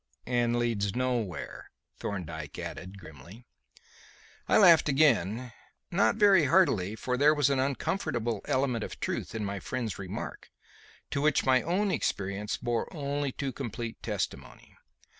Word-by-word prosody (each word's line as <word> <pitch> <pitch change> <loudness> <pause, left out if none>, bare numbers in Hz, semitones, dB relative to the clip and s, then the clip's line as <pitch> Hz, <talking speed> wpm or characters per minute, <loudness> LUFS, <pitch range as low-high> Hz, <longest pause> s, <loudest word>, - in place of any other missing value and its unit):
'" - - -39 0.2
"And 120 0 +1
leads 110 -5 0
nowhere," 120 -7 -3 0.3
Thorndyke 80 -7 -5
added 95 +2 -7
grimly. 85 - -13 1.0
I - - +5
laughed 170 -7 +7
again; 130 - +2 0.4
not 190 +4 +3
very 200 -6 +5
heartily, 125 - +3
for 125 +2 -2
there 150 +3 +5
was 145 -2 +3
an 135 - +1
uncomfortable 130 - -1
element 130 -4 0
of - - -7
truth - - -3
in 110 -2 -2
my 100 0 -3
friend's 115 0 -4
remark, 95 -2 -6 0.6
to 140 - -1
which 150 0 +2
my 130 -1 +4
own 195 +4 0
experience 100 - -2
bore 120 -2 -2
only 145 -2 -2
too 135 +1 -3
complete 115 -3 -5
testimony. 105 -4 -5
120 Hz, 140 wpm, -29 LUFS, 100-140 Hz, 1.0 s, laughed